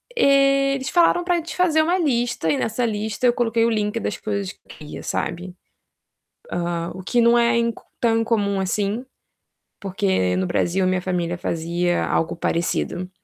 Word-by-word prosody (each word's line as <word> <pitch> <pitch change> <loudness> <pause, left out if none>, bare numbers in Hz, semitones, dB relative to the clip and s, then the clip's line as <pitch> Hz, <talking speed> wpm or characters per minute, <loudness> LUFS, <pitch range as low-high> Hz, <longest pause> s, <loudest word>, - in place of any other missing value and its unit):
Eles 275 - +3
falaram 350 0 +3
para 350 -2 +1
fazer 335 -2 +2
uma 345 +4 +1
lista 245 - 0
e 150 - +2
nessa 225 +2 -1
lista 215 +1 -2
eu 240 - +4
coloquei 230 -1 +1
o - - +2
link 215 0 -1
das - - -3
coisas 200 -2 -3
que - - -33
eu - - -33
queria, 150 -1 -9
sabe. 175 +2 -3 1.0
Hã, 170 -1 -2
o 185 - -8
que 240 +6 +1
não 235 +1 +5
é 235 0 +3
inc 235 -1 -1 0.2
tão 230 -1 +2
incomum 205 -3 0
assim, 205 +5 -1 0.8
porque 190 - 0
no 95 0 0
Brasil 185 - 0
a - - +2
minha 185 0 0
família 175 -2 -2
fazia 175 +1 -1
algo 165 +1 -1
parecido. 175 +2 -2
210 Hz, 170 wpm, -22 LUFS, 180-245 Hz, 1.0 s, não